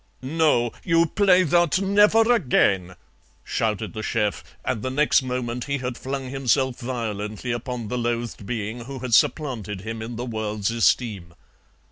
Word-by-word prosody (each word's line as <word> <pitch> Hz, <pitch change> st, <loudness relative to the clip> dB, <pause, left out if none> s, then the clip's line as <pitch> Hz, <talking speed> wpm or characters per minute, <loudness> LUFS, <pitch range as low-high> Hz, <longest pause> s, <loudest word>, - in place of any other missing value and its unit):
"'Noh! 135 Hz, -5 st, +2 dB
You 165 Hz, -1 st, +3 dB
play 185 Hz, +1 st, +4 dB
thot 175 Hz, +2 st, +3 dB
never 210 Hz, +4 st, +4 dB
again,' 100 Hz, -, +2 dB, 0.5 s
shouted 110 Hz, -1 st, -2 dB
the 110 Hz, -, -5 dB
CHEF, 105 Hz, -1 st, -1 dB, 0.2 s
and 110 Hz, -, -1 dB
the 130 Hz, -, -2 dB
next 145 Hz, +2 st, +3 dB
moment 125 Hz, -1 st, -3 dB
he 140 Hz, 0 st, -1 dB
had 125 Hz, -1 st, -4 dB
flung 135 Hz, 0 st, -5 dB
himself 135 Hz, -1 st, +1 dB
violently 115 Hz, -2 st, -4 dB
upon 120 Hz, -1 st, -4 dB
the 125 Hz, +3 st, -2 dB
loathed 120 Hz, -3 st, -3 dB
being 115 Hz, +1 st, -4 dB
who 135 Hz, +1 st, -7 dB
had 125 Hz, -2 st, -4 dB
supplanted 120 Hz, -8 st, +1 dB
him 110 Hz, +2 st, -5 dB
in 115 Hz, +2 st, -6 dB
the 120 Hz, +2 st, -4 dB
world's 110 Hz, -3 st, -2 dB
esteem. 105 Hz, -6 st, 0 dB
120 Hz, 150 wpm, -24 LUFS, 110-140 Hz, 0.5 s, play